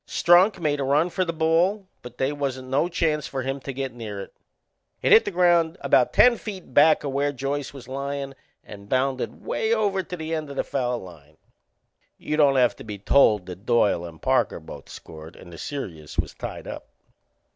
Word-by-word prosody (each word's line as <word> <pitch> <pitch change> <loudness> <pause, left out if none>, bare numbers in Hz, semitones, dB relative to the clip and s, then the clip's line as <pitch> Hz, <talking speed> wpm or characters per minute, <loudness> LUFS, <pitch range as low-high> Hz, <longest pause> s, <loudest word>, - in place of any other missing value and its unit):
Strunk 180 +4 +4
made 150 -3 0
a - - 0
run 150 +6 +2
for 185 - 0
the 170 - -2
ball, 170 +5 +1
but 125 0 -11
they 130 +1 0
wasn't 130 -3 -4
no 145 +6 +1
chance 155 -4 0
for 135 -1 -4
him 135 +2 -3
to 135 - -6
get 135 -1 -4
near 110 -4 -7
it. 100 - -9 0.7
It - - +2
hit 440 +2 +7
the - - -1
ground 175 -2 +2
about 125 -2 +3
ten 245 -1 +5
feet 190 - -8
back 150 +2 +5
o' - - -1
where 140 +1 0
Joyce 140 +1 -3
was 135 -4 -12
lyin' 140 +1 -4 0.3
and 100 -1 -12
bounded 130 0 -1
way 225 +1 0
over 200 -3 0
to 180 0 -7
the 160 0 -5
end 155 -2 -3
o' 140 - -8
the - - 0
foul 125 -2 -2
line. 80 -7 -13 0.8
You 150 - -3
don't 145 -3 +4
have 125 -2 +3
to - - -10
be 105 -2 -7
told 105 -2 +3
that 95 +4 -10
Doyle 105 -7 +2
and 85 -2 -10
Parker - - +1
both - - -11
scored 80 +1 -11
and 85 - -13
the 85 - -10
serious 85 - -7
was - - -1
tied - - -7
up. - - -8
140 Hz, 205 wpm, -24 LUFS, 120-165 Hz, 0.8 s, hit